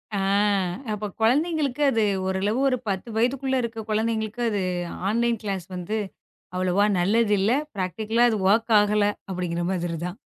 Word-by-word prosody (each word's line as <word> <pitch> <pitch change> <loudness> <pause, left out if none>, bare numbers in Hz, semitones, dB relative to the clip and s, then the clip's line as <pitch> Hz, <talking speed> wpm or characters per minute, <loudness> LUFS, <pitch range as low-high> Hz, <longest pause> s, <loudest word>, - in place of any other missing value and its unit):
அ - - 0 0.7
அப்பக் 210 -2 -4
கொழந்தைங்களுக்கு 295 +3 +1
அது 225 -3 +2 0.2
ஒரு 190 0 0
அளவு. 215 +5 +1
ஒரு 255 - +1
10 190 +3 -3
வயதுக்குள்ள 265 +3 +1
இருக்க 225 -2 -5
கொழந்தைங்களுக்கு 220 +1 -1
அது 205 -2 -1 0.5
ஆன்லைன் 235 0 +1
கிளாஸ் 195 -4 -3
வந்து 180 +5 -3 0.6
அவ்வளவா 185 +2 +2
நல்லதில்ல. 205 +1 +2 0.3
ப்ராக்டிக்களா 215 +6 +1
அது 215 - -1
வொர்க் 225 +2 +3
ஆகல 210 0 +2 0.3
அப்டிங்கற 175 -2 -2
மாதிரி 170 -2 -2
தான். 180 +3 -7
215 Hz, 140 wpm, -24 LUFS, 190-230 Hz, 0.7 s, வொர்க்